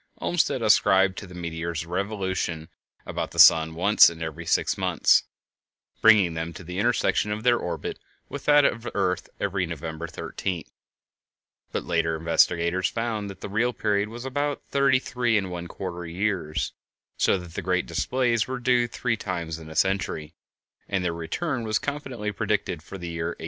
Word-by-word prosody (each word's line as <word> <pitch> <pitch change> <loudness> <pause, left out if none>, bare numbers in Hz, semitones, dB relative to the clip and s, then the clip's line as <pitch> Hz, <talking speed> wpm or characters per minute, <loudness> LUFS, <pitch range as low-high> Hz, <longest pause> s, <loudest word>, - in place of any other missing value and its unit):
Olmsted 155 -8 0
ascribed 95 -2 +4
to 100 - -10
the 90 - -12
meteors 85 -1 -4
a - - -14
revolution 95 -4 -2 0.4
about - - -3
the - - -12
sun 80 0 +7
once 100 +6 +6
in 85 -1 -10
every 80 +1 -6
six - - +2
months, - - +3 0.8
bringing 105 -6 +6
them 80 +1 -4
to 90 - -10
the 90 +2 -5
intersection 115 -2 +1
of 105 +1 -3
their 120 -1 +4
orbit 85 -2 -4 0.3
with 140 - -7
that 145 -1 +6
of 115 - +1
the 120 - -6
earth 90 -3 0
every 95 -2 -1
November 80 0 -5
13th; 85 +1 -5 1.0
but - - -2
later 80 -1 0
investigators 85 +2 +2
found 115 -3 -3
that 95 -1 -10
the - - -5
real 115 +5 0
period 105 -1 0
was 120 +3 -8
about 145 +2 -2
thirty 140 -1 +4
three 125 -3 0
and 95 -3 -2
one 85 -1 -5
quarter 90 0 -6
years, 90 -3 -2 0.4
so - - +3
that 90 -2 -10
the - - -3
great 90 0 0
displays 120 -4 0
were 130 0 -3
due 125 -1 +2
three 115 0 -1
times 85 -6 -4
in 80 -1 -11
a 80 - -10
century, 95 -5 0 0.6
and 95 -2 -1
their 85 - 0
return 120 - -3
was 110 -1 +1
confidently 130 -7 -4
predicted 105 -5 -1
for 95 - -9
the 90 -2 -7
year 85 0 -3
1866. 85 - -6
95 Hz, 175 wpm, -25 LUFS, 85-115 Hz, 1.0 s, sun